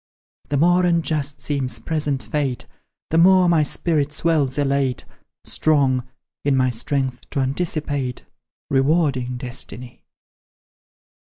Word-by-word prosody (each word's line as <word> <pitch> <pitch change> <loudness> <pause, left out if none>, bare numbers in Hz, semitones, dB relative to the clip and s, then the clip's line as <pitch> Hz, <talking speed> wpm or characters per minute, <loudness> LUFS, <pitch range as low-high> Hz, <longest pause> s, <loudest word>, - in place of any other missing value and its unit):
The 145 - 0
more 175 +4 +4
unjust 155 -4 0
seems 130 -5 -1
present 145 +2 -2
fate, 140 -4 -2 0.5
The 165 - +3
more 185 +1 +6
my 170 -2 +4
spirit 150 0 0
swells 150 -3 0
elate, 140 -3 0 0.4
Strong, 135 -5 +1 0.4
in 140 -2 +2
thy 130 -1 +2
strength, 130 +1 -3
to - - -2
anticipate 140 -2 -2 0.5
Rewarding 135 -3 +1
destiny! 125 -1 -6
140 Hz, 105 wpm, -21 LUFS, 130-155 Hz, 0.5 s, more